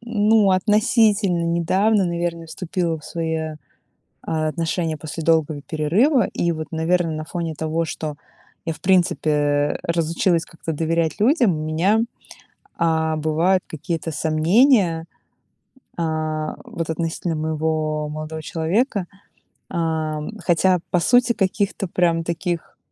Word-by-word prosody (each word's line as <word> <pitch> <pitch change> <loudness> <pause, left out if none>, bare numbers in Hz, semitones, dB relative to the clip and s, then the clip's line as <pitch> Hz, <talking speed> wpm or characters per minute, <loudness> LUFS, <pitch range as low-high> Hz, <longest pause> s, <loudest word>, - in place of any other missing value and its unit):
ну 215 -3 +3
относительно 210 -1 +3
недавно, 190 +5 +2
наверное, 170 -1 -2
вступила 170 -1 -2
в 150 - -16
свои, 160 -2 -3 0.7
а, 155 -1 -1
отношения 165 0 -1
после 160 +1 -6
долгого 160 -2 +2
перерыва. 195 - +2
И 170 - 0
вот, 155 -2 -4
наверное, 165 0 0
на 155 0 -5
фоне 165 -1 -4
того, 160 +2 -1
что 155 -2 -5 0.5
я 165 - -1
в - - -16
принципе 150 -5 +2
разучилась 170 +1 +1
как-то 165 -1 -6
доверять 160 0 0
людям, 240 - +4
у 155 - -4
меня, 180 +8 +2 0.8
а, 160 -1 +1
бывают 165 +5 +2
какие-то 165 +1 -4
сомнения. 165 - +3 0.9
А, 155 -2 -2
вот 165 -1 -5
относительно 165 +1 -2
моего 155 -1 -1
молодого 155 +1 -6
человека. 185 - 0 0.6
А, 160 -3 -1 0.2
хотя, 180 +1 +3
по 180 - +2
сути, 245 +5 +4
каких-то 195 -1 -1
прям 170 -1 +1
таких, 170 0 -3
165 Hz, 120 wpm, -22 LUFS, 155-185 Hz, 0.9 s, людям